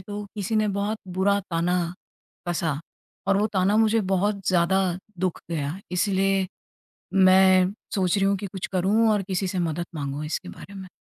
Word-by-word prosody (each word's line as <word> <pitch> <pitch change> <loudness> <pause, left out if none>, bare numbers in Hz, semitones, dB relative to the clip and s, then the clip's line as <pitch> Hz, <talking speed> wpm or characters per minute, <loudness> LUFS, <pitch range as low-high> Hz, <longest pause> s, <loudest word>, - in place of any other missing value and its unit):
तो 205 +2 -6
किसी 210 +2 -1
ने 215 -1 +2
बहुत 210 +2 -1 0.2
बुरा 200 +1 +3
ताना 175 +2 +1 0.7
कसा 160 -4 -1 0.5
और 195 - +4
वो 210 - +2
ताना 190 +3 +3
मुझे 225 0 +4
बहुत 200 +1 0
ज़्यादा 185 +1 +3 0.4
दुःख 185 -2 -1
गया 145 -4 -1
है। 190 +5 -8
इसलिए 195 +1 +1 0.7
मैं 185 0 +6 0.2
सोच 185 -3 +1
रही 195 - +2
हूँ 200 - +2
कि 200 - -5
कुछ 190 -1 -5
करूँ 200 +5 +3
और 210 -2 +2
किसी 190 0 -1
से 185 - -3
मदद 170 0 -1
माँगूँ 140 0 -4
इसके 180 +4 -4
बारे 200 - -12
में। 190 -1 -8
190 Hz, 175 wpm, -25 LUFS, 180-200 Hz, 0.7 s, मैं